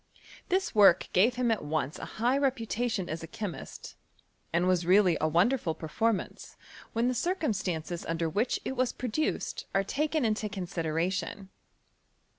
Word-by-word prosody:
This 380 0 +1
work 195 -4 +6
gave 225 +7 +4
him 245 -1 +1
at 220 - -1
once 150 -1 -2
a - - -5
high 240 +4 +2
reputation 245 -6 0
as 160 +1 -4
a 165 - -7
chemist, 195 +1 -7 0.6
and 170 +2 +2
was 180 -2 +2
reallif 185 -1 +4
a 155 - +3
wonderful 175 - +2
performance, 220 +7 -2 0.4
when 230 +2 +1
the 255 - +1
circumstances 195 - -2
under 165 0 -1
which 210 +10 0
it 265 - -3
was 255 -1 +1
produced 255 +5 -2
are 195 - +3
taken 300 +5 0
into 215 -1 0
consi 185 -4 -4
deration. 185 +4 -2
205 Hz, 150 wpm, -29 LUFS, 170-245 Hz, 0.6 s, work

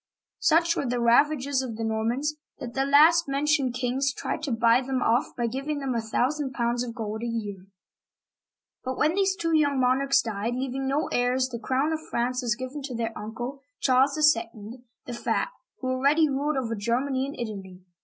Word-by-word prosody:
Such 335 +2 +3
were 280 - -2
the 245 0 -1
ravages 265 +3 +3
of 245 -4 -5
the 225 - -3
Normans 230 +7 -1 0.2
that 240 -2 -7
the 270 0 0
last 315 +4 +6
mentioned 275 -2 +1
kings 255 +2 0
tried 295 - -4
to 290 -3 -3
buy 230 +2 +4
them 260 0 -2
off 240 +3 +1
by 240 - 0
giving 270 +6 -3
them 270 -2 -2
a 230 - 0
thousand 265 +5 -1
pounds 240 0 0
of 235 -2 -6
gold 220 -2 -4
a 235 - -3
year. 205 -5 -5 1.2
But 260 0 -3
when 305 +2 +2
these 385 0 +1
two 330 -3 0
young 285 -3 +2
monarchs 270 +2 +3
died, 225 +1 -3
leaving 265 +1 -3
no 285 +4 0
heirs, 250 +1 +1
the 235 -2 -5
crown 270 +6 0
of 315 - -2
France 250 +2 -1
was 235 -2 0
given 255 +4 -6
to 255 -3 -6
their 230 -1 -3
uncle, 240 +6 -6 0.2
Charles 265 +2 +3
II., 230 -5 +1 0.2
the 245 - -6
Fat, 235 - -1 0.3
who 255 - -2
already 280 +5 +3
ruled 285 +1 -1
over 235 -3 -2
Germany 255 +5 -1
and 280 - -8
Italy. 195 -5 -7
255 Hz, 190 wpm, -26 LUFS, 235-280 Hz, 1.2 s, last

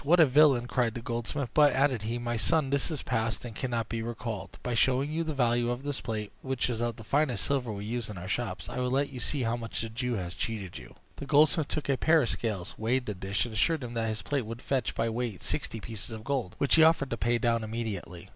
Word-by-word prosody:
"What 170 +5 +4
a 160 - +9
villain!" 135 -3 +5
cried 120 -2 0
the 120 - -4
goldsmith. 120 +3 -3
"But," 150 -1 +6
added 135 -4 +2
he, 115 +3 -2
"my 120 0 -2
son, 140 +5 +2
what 140 +2 +1
is 155 -4 -4
past 115 -1 -1
cannot 120 -2 -2
be 115 0 -3
recalled. 110 -4 -5
By 125 - -2
showing 130 +4 +2
you 165 +2 0
the 155 -2 -3
value 120 -2 +2
of 120 +2 -3
this 145 -1 -3
plate, 110 -3 -4
which 130 -1 -1
is 115 -1 -3
of 120 -1 -1
the 115 - -11
finest 140 +1 +1
silver 130 -5 0
we 100 0 -5
use 115 0 -3
in 105 - -7
our 90 +2 -6
shops, 105 -1 -2
I - - -4
will 125 0 0
let 140 +3 +1
you 130 - -7
see 140 +1 0
how 115 0 +1
much 115 -1 -4
the 115 - -4
Jew 120 +2 -2
has 90 -4 -4
cheated 100 -2 -4
you." - - -13 0.2
The 140 - -7
goldsmith 155 +1 +4
took 155 - -2
a 135 -2 +2
pair 160 +1 +4
of 120 - 0
scales, 105 -6 -2
weighed 125 +3 +1
the 105 - -2
dish, 100 +3 -1
and 120 - -7
assured 155 +7 +2
him 120 -1 -6
that 115 -1 -1
his 110 0 -3
plate 140 -6 -1
would 115 +2 -7
fetch 135 -2 -1
by 115 - +1
weight 115 -4 -3
sixty 115 - -2
pieces 110 -1 -4
of 110 -1 -7
gold, 130 -8 -2
which 140 - +2
he 160 - +8
offered 160 -4 +4
to - - +1
pay 120 +1 +2
down 115 0 +1
immediately. 110 -6 -5
120 Hz, 260 wpm, -29 LUFS, 110-135 Hz, 0.2 s, a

